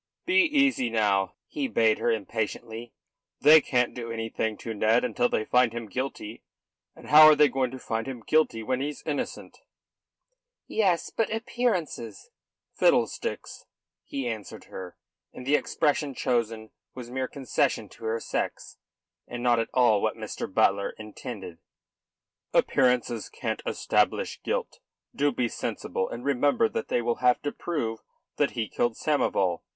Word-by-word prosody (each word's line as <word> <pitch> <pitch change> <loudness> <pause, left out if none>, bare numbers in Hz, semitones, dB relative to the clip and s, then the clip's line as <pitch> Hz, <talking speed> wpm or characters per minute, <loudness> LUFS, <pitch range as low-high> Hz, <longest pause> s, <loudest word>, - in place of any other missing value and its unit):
"Be 380 +2 +5
easy 275 - +2
now," 100 -4 +1
he 290 -4 -3
bade 115 - +2
her - - +1
impatiently. 110 +2 -3 0.5
"They 155 +2 +8
can't 125 -3 +1
do 115 -2 -6
anything 115 -1 -3
to 115 - -5
Ned 110 +3 +2
until 120 -1 +1
they 110 - -1
find 125 -1 +3
him 120 -1 -5
guilty; 115 -1 -5 0.5
and - - -13
how 155 +1 +10
are 155 - +8
they 150 0 +6
going 130 -1 0
to 130 - -8
find 115 -2 -3
him 125 -4 -6
guilty 155 -8 +2
when 130 +3 -1
he's 145 +1 -4
innocent?" 145 -3 -4 1.1
"Yes; 190 -6 +1
but 225 - +1
the 220 - -3
appearances!" 220 - -2 0.4
"Fiddlesticks!" - - 0 0.4
he 135 -3 -4
answered 110 -4 -6
her 90 -2 -9 0.4
and 125 - -9
the 140 - +1
expression 150 -2 +1
chosen 115 -3 -1 0.2
was 125 -2 -8
a - - -10
mere 130 0 -1
concession 135 -4 -1
to 115 - -12
her 110 +1 -1
sex, - - -4 0.5
and 120 0 -6
not 120 -2 +3
at 115 - -1
all 120 -5 +4
what - - -1
Mr. - - -5
Butler 100 +1 +2
intended. 105 -4 -8 1.0
"Appearances 125 -3 +2
can't - - -4
establish - - 0
guilt. - - -3 0.4
Do 145 +1 +2
be 120 - 0
sensible, 95 -4 -3
and 120 +2 -7
remember 140 -2 +3
that - - -4
they 120 - 0
will 120 0 0
have 125 -1 +3
to 145 - -1
prove 115 -10 -3 0.4
that 145 - +1
he 110 -2 -1
killed 120 -2 -1
Samoval. 95 - +1
120 Hz, 155 wpm, -27 LUFS, 110-145 Hz, 1.1 s, how